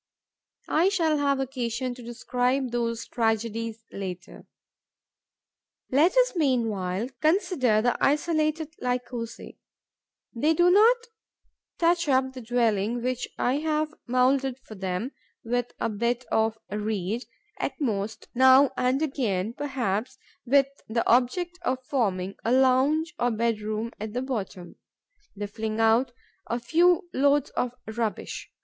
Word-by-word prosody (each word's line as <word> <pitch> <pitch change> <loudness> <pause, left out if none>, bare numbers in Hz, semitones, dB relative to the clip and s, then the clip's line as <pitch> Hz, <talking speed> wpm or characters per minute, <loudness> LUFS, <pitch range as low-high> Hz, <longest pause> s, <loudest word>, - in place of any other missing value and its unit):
I 340 +5 +3
shall 325 -6 +1
have 280 -1 +1
occasion 250 -1 -2
to 245 - -12
describe 250 +2 -1
those 230 -1 -2
tragedies 225 0 -1
later. 185 -2 -7 1.4
Let 320 - +4
us - - +4
meanwhile 225 - 0
consider 310 - +2
the 245 - +2
isolated 310 +1 +1
Lycosae. 245 -2 -4 0.7
They 300 +7 +2
do 350 +2 +5
not 445 +6 +6 0.8
touch 340 -2 +2
up 260 0 +2
the 255 - -8
dwelling 230 -1 0
which 255 0 -2
I 255 +3 +1
have 310 0 -1
moulded 255 +1 +2
for - - -10
them 190 +5 -3 0.3
with 245 +1 -1
a - - 0
bit 235 +3 -1
of 220 0 +1
reed; 210 +1 -2 0.3
at - - -3
most, 220 -6 -2
now 260 +2 +6
and 255 +4 +1
again, 225 -8 -1
perhaps 255 -3 -2 0.3
with 275 +2 +5 0.2
the 230 +1 -1
object 345 +9 +2
of 260 -6 -2
forming 195 -8 -1
a 230 - 0
lounge 265 +6 +3
or 245 - +2
bedroom 220 -1 -1
at 215 0 -5
the 250 +2 -2
bottom, 200 -8 -5 0.6
they 205 +1 -4
fling 215 +2 -4
out 225 +3 +3 0.4
a 235 - -1
few 350 +7 +3
loads 285 +1 +2
of 250 0 -2
rubbish. 220 0 -4
245 Hz, 125 wpm, -26 LUFS, 225-280 Hz, 1.4 s, not